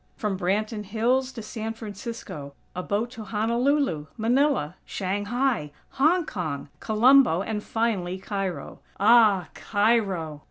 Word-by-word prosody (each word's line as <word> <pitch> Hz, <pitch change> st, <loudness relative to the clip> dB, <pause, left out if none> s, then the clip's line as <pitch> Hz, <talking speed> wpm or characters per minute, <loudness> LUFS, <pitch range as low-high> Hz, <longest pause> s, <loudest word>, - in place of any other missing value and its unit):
From 210 Hz, -3 st, -2 dB
Branton 210 Hz, +4 st, -1 dB
Hills 245 Hz, +6 st, +1 dB
to 225 Hz, -, -7 dB
San 225 Hz, 0 st, -5 dB
Francisco; 205 Hz, -9 st, -7 dB, 0.2 s
a 180 Hz, -, -2 dB
boat 210 Hz, +5 st, -1 dB
to 230 Hz, -3 st, -8 dB
Honolulu, 225 Hz, -, 0 dB
Manila, 240 Hz, -, +1 dB
Shanghai, 205 Hz, -, -1 dB, 0.2 s
Hong 320 Hz, +5 st, +2 dB
Kong, 155 Hz, -, -4 dB
Colombo, 230 Hz, -4 st, +5 dB
and 210 Hz, -1 st, -3 dB
finally 200 Hz, -6 st, -1 dB
Cairo. 195 Hz, -2 st, -4 dB, 0.2 s
Ah! 210 Hz, -5 st, +5 dB
Cairo!! 195 Hz, -8 st, 0 dB
215 Hz, 115 wpm, -26 LUFS, 190-235 Hz, 0.2 s, Colombo